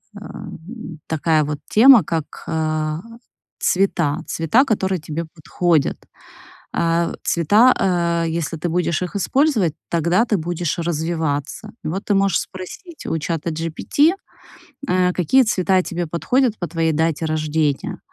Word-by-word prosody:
м, 175 -1 -9
такая 160 0 +1
вот 150 0 -4
тема, 235 -1 +7
как 160 -1 -4
а 155 0 -1 0.6
цвета, 170 -5 +1
цвета, 165 - +2
которые 190 -6 0
тебе 160 +2 -4
подходят. 165 -1 0 0.8
А, 170 0 0
цвета, 210 +10 +4 0.5
э, - - -2
если 165 -1 -3
ты 175 - -2
будешь 170 0 0
их 180 +2 -4
использовать, 220 - +1
тогда 170 +7 +2
ты 215 - +1
будешь 170 0 -2
развиваться. 160 +1 -2
Вот 190 +6 -3
ты 205 - +1
можешь 195 -3 +2
спросить 300 - -9
у - - -1
чатаGPT, 165 - 0 0.8
э, 180 -2 +2
какие 190 - +3
цвета 190 -4 +2
тебе 175 -1 -3
подходят 230 - +1
по 175 - -4
твоей 165 -1 0
дате 160 +1 0
рождения, 155 -2 -1
170 Hz, 125 wpm, -20 LUFS, 160-195 Hz, 0.8 s, тема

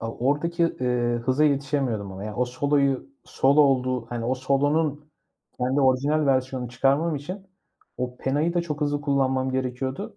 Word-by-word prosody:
O 115 0 -5
oradaki, 170 +4 +1 0.2
ııı, 120 -1 0
hıza 130 +5 +1
yetişemiyordum 135 -8 0
ama, 95 +2 -7
yani, 105 0 -6
o 125 - +2
soloyu, 140 +1 0 0.2
solo 140 +3 +3
olduğu 130 -4 +2
hani, 115 0 -4
o 125 +2 +1
solonun 145 +3 0 0.6
kendi 130 +3 +1
orijinal 140 +3 +2
versiyonunu 130 -2 0
çıkarmam 140 +6 +1
için 185 +8 -7 0.5
o 125 0 -4
penayı 150 +7 0
da 175 - +2
çok 150 -3 -5
hızlı 145 -1 0
kullanmam 130 -2 +1
gerekiyordu. 130 - -3
135 Hz, 155 wpm, -25 LUFS, 125-145 Hz, 0.6 s, solo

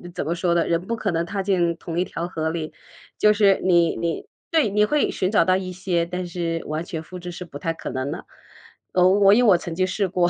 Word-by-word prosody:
怎 - - -2
么 165 - 0
说 175 -1 0
的， 170 - +2
人 170 0 +2
不 230 - -1
可 215 -3 -2
能 165 0 -1
踏 195 +2 -3
进 175 -4 +1
同 170 0 -4
一 180 - +1
条 170 -1 -4
河 160 -3 -2
里。 160 -1 -4 0.5
就 210 - +5
是 205 -2 +4
你 170 -3 +3
你 170 -1 -3 0.2
对， 315 -9 +3
你 210 +1 +2
会 300 +5 +1
寻 185 +2 -1
找 185 -6 +4
到 185 - +3
一 185 -1 -3
些， 180 -2 -1
但 180 +1 -4
是 170 -1 -3
完 155 +2 -3
全 165 -2 -5
复 180 +3 -10
制 175 0 -7
是 180 +1 -8
不 145 -3 -9
太 165 +3 -2
可 - - -7
能 130 +2 -3
的。 - - -6 0.7
哦， 180 0 +4
我 195 +1 +5
因 245 +3 +4
为 - - +6
我 175 - +6
曾 170 -1 -6
经 185 +2 0
试 195 +1 -1
过， 175 -1 +2
180 Hz, 280 characters per minute, -23 LUFS, 170-195 Hz, 0.7 s, 为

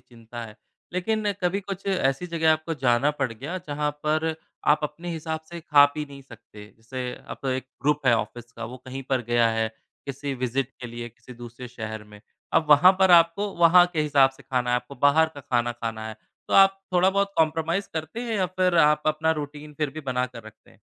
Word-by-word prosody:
चिंता 120 0 -11
है, 110 -1 -12 0.4
लेकिन 205 +3 0
कभी 180 +3 +1
कुछ 195 0 -7
ऐसी 180 -5 0
जगह 160 -1 +4
आपको 155 +1 -2
जाना 120 +4 +4
पड़ 130 -3 0
गया, 140 +11 -6
जहाँ 150 0 -1
पर 155 +1 +1 0.4
आप 150 - +1
अपने 165 +4 -5
हिसाब 160 0 -4
से 170 0 -7
खा, 150 -3 +6
पी 150 +1 -5
नहीं 140 -1 -12
सकते 110 -4 -14
जैसे 125 +2 -6 0.2
अब - - -7
तो 135 - -2
1 130 0 -2 0.2
ग्रुप 150 -1 +1
है 120 - +6
ऑफ़िस 120 +2 -5
का, - - -7
वो 125 +3 -7
कहीं 130 +1 -6
पर 130 -2 +1
गया 120 -1 +4
है, 110 0 0 0.4
किसी 140 0 -4
विजिट 130 +1 -1
के 125 - -5
लिए 120 0 -7
किसी 120 +2 -15
दूसरे 120 +1 -10
शहर 110 -3 -7
में, 105 0 -15 0.3
अब 165 -1 +3
वहाँ 175 +6 +8
पर 190 -1 +5
आपको 170 +4 +5
वहाँ 175 +1 +7
के 160 - 0
हिसाब 140 -3 +4
से 135 +1 -18
खाना 125 -2 -1
है, 125 - +3
आपको 125 +3 -6
बाहर 150 +3 +5
का 145 - -8
खाना 120 -2 0
खाना 115 -2 -5
है 110 - -8 0.3
तो - - -1
आप 195 0 +6
थोड़ा 180 +1 +4
बहुत 200 +1 +1
कोम्प्रोमाईज़ 165 +4 +1
करते 160 +8 -4
हैं 235 -2 -3
या 190 -2 +1
फिर 185 0 0
आप 150 -1 +4
अपना 155 +1 +1
रूटीन 150 +1 -8
फिर 150 -3 0
भी 155 - -7
बना 125 0 +1
कर 125 -2 -11
रखते 110 0 -16
हैं? - - -23
145 Hz, 220 wpm, -25 LUFS, 125-165 Hz, 0.4 s, वहाँ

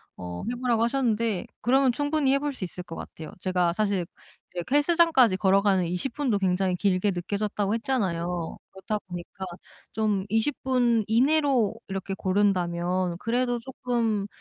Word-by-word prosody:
어 90 -1 -6
해 - - -3
보라고 240 -3 +2
하셨는데 230 -5 0
그러면 260 +2 +4
충분히 290 +1 +1
해 275 - +3
볼 290 0 -2
수 255 - -7
있을 180 0 -6
것 165 -2 -9
같아요. 160 -1 -8
제가 180 -2 +1
사실 200 -2 0 0.5
이렇게 175 +10 -2
헬스장까지 290 - +4
걸어가는 195 -1 +3
20 180 +10 -3
분도 260 -8 0
굉장히 185 -1 +1
길게 190 +1 +1
느껴졌다고 200 +3 -2
했잖아요. 180 -9 -2
그렇다 210 +2 -3
보니까 180 +2 -7 0.5
좀 210 -3 0
20 225 +7 0
분 245 -4 +2
이내로 265 -1 +3
이렇게 195 0 -4
고른다면 185 -2 0
그래도 245 +3 0
쪼끔 230 -4 -1
210 Hz, 330 characters per minute, -26 LUFS, 185-250 Hz, 0.5 s, 그러면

